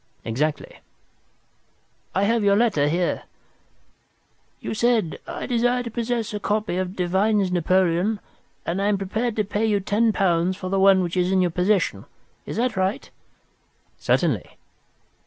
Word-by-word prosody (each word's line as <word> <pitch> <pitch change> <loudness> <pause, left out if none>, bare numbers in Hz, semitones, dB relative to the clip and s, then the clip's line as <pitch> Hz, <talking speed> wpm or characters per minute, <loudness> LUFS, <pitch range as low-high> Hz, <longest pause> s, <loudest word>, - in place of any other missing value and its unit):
"Exactly." 145 +7 -2 1.4
"I 190 - +2
have 225 +1 +2
your 200 0 +4
letter 205 -10 +2
here. 175 +3 -1 1.3
You - - -4
said, 225 -6 +1
'I - - -5
desire 245 0 +1
to 235 - -6
possess 230 -1 -2
a 210 - -3
copy 210 -2 -1
of 185 0 -3
Devine's 190 +2 +1
Napoleon, 185 +3 +1 0.5
and 180 +4 -1
am 205 0 +2
prepared 215 +4 -2
to 215 - +1
pay 210 +2 -1
you 210 -2 +2
ten 215 +3 +1
pounds 185 -2 +1
for 185 - -5
the 195 0 +1
one 190 -1 +5
which 175 0 -3
is 180 0 +1
in 190 - +3
your 175 - 0
possession.' 185 +4 0 0.4
Is - - -5
that 245 0 0
right?" 190 +2 -1 0.9
"Certainly." - - 0
195 Hz, 145 wpm, -23 LUFS, 180-220 Hz, 1.4 s, one